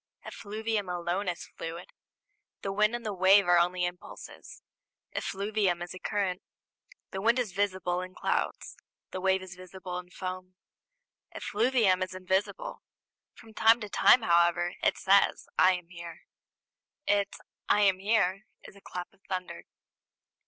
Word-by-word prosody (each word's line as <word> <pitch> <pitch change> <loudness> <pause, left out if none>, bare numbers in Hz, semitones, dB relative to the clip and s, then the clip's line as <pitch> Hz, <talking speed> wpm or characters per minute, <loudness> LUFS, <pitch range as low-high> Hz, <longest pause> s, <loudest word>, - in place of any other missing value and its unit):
Effluvium 215 -1 -3
alone 175 +3 -2
is 175 - -5
fluid. 165 +2 -8 0.7
The 195 - -2
wind 215 +3 +2
and 240 -1 -6
the 210 - -2
wave 190 +1 +5
are 175 0 +6
only 180 +1 +1
impulses; 175 0 -9 0.5
effluvium 200 -3 -1
is 175 - -7
a 185 - -9
current. 195 -2 -1 0.7
The 190 - -4
wind 230 +4 +3
is 240 -6 -1
visible 185 -2 -1
in 185 0 -8
clouds, - - -2 0.4
the 185 - -5
wave 190 0 +2
is 185 0 -9
visible 185 0 -7
in 180 0 -11
foam; 185 0 -6 0.8
effluvium 215 -4 +2
is 185 0 -3
invisible. 190 - -2 0.5
From 225 -1 -15
time 225 +2 +5
to 210 - -5
time, 240 +4 +5
however, 175 -1 +3
it - - +2
says, 200 +1 +3
"I 185 +1 +6
am 180 -1 -9
here." 170 -1 -9 0.8
Its 200 -1 +1 0.3
"I 210 - +4
am 195 -2 +4
here" 195 -1 +1 0.2
is - - -13
a 200 - -16
clap 180 0 -7
of 195 - -29
thunder. 185 -1 -4
190 Hz, 145 wpm, -29 LUFS, 180-205 Hz, 0.8 s, are